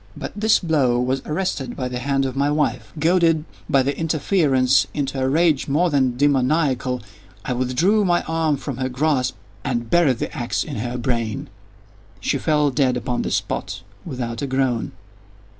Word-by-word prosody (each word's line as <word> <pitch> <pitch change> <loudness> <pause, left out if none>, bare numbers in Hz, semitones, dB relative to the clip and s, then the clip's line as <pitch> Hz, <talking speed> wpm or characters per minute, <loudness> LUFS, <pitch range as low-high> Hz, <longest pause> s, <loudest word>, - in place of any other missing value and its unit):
But - - -5
this 220 +1 +4
blow 140 -8 +1
was 130 +2 0
arrested 150 -6 -2
by 130 - -3
the 125 0 -4
hand 135 +1 0
of 130 - -3
my 140 +1 +1
wife. 125 -8 -1
Goaded, 165 -1 +3 0.2
by 135 -1 +4
the 140 +2 -1
interference, 145 - +2
into 135 -2 -2
a 130 - +1
rage 155 -1 +2
more 165 +5 +2
than 130 -4 +1
demoniacal, 135 -2 +1 0.4
I 125 - -1
withdrew 130 - +2
my 175 -2 +2
arm 160 -2 0
from 135 -2 -5
her 130 0 -1
grasp 130 -1 0 0.3
and 120 -3 -2
buried 155 -8 +4
the - - -4
axe - - -1
in - - -6
her 120 +3 -3
brain. 115 -3 -2 0.7
She - - -1
fell 150 -2 +2
dead 130 -2 +2
upon 125 0 -2
the - - -2
spot, - - -3 0.2
without 120 -3 -4
a 140 - -2
groan. 130 -3 0
135 Hz, 170 wpm, -22 LUFS, 125-155 Hz, 0.7 s, this